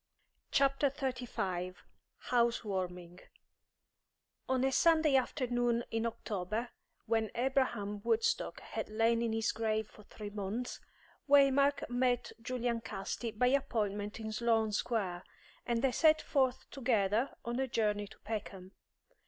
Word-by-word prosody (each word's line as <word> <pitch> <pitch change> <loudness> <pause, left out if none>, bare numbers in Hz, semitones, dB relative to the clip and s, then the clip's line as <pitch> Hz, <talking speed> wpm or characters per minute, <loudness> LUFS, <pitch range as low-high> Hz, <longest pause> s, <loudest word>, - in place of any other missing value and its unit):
CHAPTER 275 +1 +3
XXXV 245 -10 -3 0.6
HOUSE 235 -1 +3
WARMING 180 -3 -4 1.3
On 260 -1 +2
a 270 - +2
Sunday 315 -1 +4
afternoon 245 -2 +1
in 225 +1 0
October, 215 +1 -3 0.4
when 225 -1 +1
Abraham 240 -5 0
Woodstock 455 0 +1
had - - -5
lain 225 +2 +2
in 230 -1 0
his 225 0 +1
grave 220 -1 -1
for - - -16
three 205 0 -9
months, 210 +4 -4 0.5
Waymark 280 0 +5
met 245 0 +1
Julian 240 -1 -1
Casti 225 +2 -4
by 225 +3 +2
appointment 210 -6 -1
in 220 -1 -4
Sloane 225 -1 +2
Square, 200 -5 -1 0.4
and 235 0 0
they 265 - +4
set 310 +4 +5
forth 265 -3 0
together 235 -2 +1
on 240 +2 -2
a 265 - 0
journey 210 -3 0
to - - -15
Peckham. 200 -3 -5
230 Hz, 125 wpm, -33 LUFS, 210-255 Hz, 1.3 s, Waymark